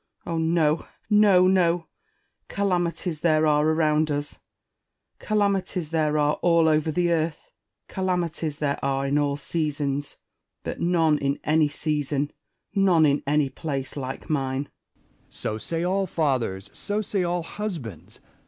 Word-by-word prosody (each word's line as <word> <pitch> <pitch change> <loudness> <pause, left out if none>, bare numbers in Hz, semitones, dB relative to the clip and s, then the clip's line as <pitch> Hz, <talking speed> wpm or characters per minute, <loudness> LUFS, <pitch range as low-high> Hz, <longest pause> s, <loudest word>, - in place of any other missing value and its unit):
Spenser. - - -5
Oh, - - -1
no, 160 -1 +1 0.2
no, 205 -3 +6
no! 175 -3 +2 0.6
Calamities 175 -4 -1
there 155 -1 +3
are 150 -1 +3
around 155 -1 +2
us; 145 0 -3 0.8
calamities 195 -6 0
there 155 -2 +1
are 150 0 +1
all 170 -2 +4
over 155 0 +2
the 175 +2 +1
earth; 160 -1 -2 0.4
calamities 170 -5 -2
there 145 -2 -2
are 135 0 0
in 140 +2 +1
all 145 -1 0
seasons: 145 -2 -2 0.5
but - - -5
none 165 -3 +3
in 140 0 -1
any 155 0 +3
season, 145 -1 -2 0.4
none 185 -5 +4
in 145 -1 +2
any 145 -1 +2
place, 135 -4 -4
like 130 -2 -5
mine. 135 -2 -1 0.6
Essex. - - -17
So 110 - -2
say 165 +7 -2
all 190 +2 0
fathers, 120 - -1
so 205 +1 -2
say 200 -2 0
all 175 0 -1
husbands. 165 - -6
155 Hz, 140 wpm, -25 LUFS, 145-175 Hz, 0.8 s, no